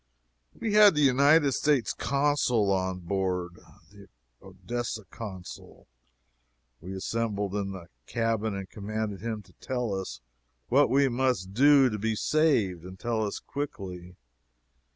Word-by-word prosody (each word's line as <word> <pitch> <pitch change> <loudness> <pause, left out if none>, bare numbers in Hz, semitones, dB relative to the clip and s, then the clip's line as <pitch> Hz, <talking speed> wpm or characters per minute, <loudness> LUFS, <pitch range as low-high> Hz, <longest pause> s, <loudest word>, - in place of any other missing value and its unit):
We 220 - -2
had 210 -4 +7
the 150 - +2
United 140 +2 +5
States 145 -2 +1
Consul 140 -7 +1
on 95 -1 -1
board 90 -1 -2 0.3
the - - -15 0.3
Odessa 105 +4 -5
Consul. 95 -5 -9 0.9
We 95 +4 -7
assembled 105 -1 -2
in 100 -1 -2
the 90 -3 -9 0.2
cabin 115 -2 -1
and 95 -1 -5
commanded 105 -1 -4
him 110 -2 -4
to 90 -1 -22
tell 125 -5 -2
us 95 -10 -5 0.5
what - - +4
we 140 +2 +4
must 125 -7 -1
do 140 +3 +6
to 105 - -3
be 110 +1 -1
saved, 110 - +1
and 95 +1 -10
tell 115 -2 -1
us 105 - -3
quickly. 95 -11 -6
110 Hz, 130 wpm, -28 LUFS, 95-130 Hz, 0.9 s, had